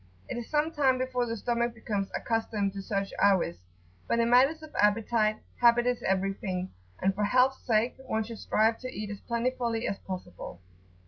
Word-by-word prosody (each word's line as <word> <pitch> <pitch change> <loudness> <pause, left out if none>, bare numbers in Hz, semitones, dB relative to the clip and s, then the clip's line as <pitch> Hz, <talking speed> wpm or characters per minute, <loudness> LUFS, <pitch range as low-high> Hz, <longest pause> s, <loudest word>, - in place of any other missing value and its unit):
It - - -4
is 240 -1 -6
some 305 +1 +1
time 270 -5 +2
before 255 -1 -1
the 230 0 -3
stomach 235 +2 -1
becomes 205 -3 -3
accustomed 215 -3 -1
to 200 - -5
such 195 0 -2
hours, 190 - +3 0.5
but - - +1
in 235 0 +2
matters 275 +6 +4
of 310 - -11
appetite, 215 +1 +2 0.2
habit 240 0 +5
is 245 -1 0
everything, 190 -1 -1 0.3
and 190 +1 +2
for 205 +1 0
health's 255 +5 +3
sake 230 +1 +2
one 220 0 0
should 225 0 -8
strive 220 +1 +2
to 255 - -6
eat 210 -3 -5
as 205 - -7
plentifully 235 -1 -1
as 200 - -3
possible. 185 -2 -7
225 Hz, 180 wpm, -29 LUFS, 200-245 Hz, 0.5 s, habit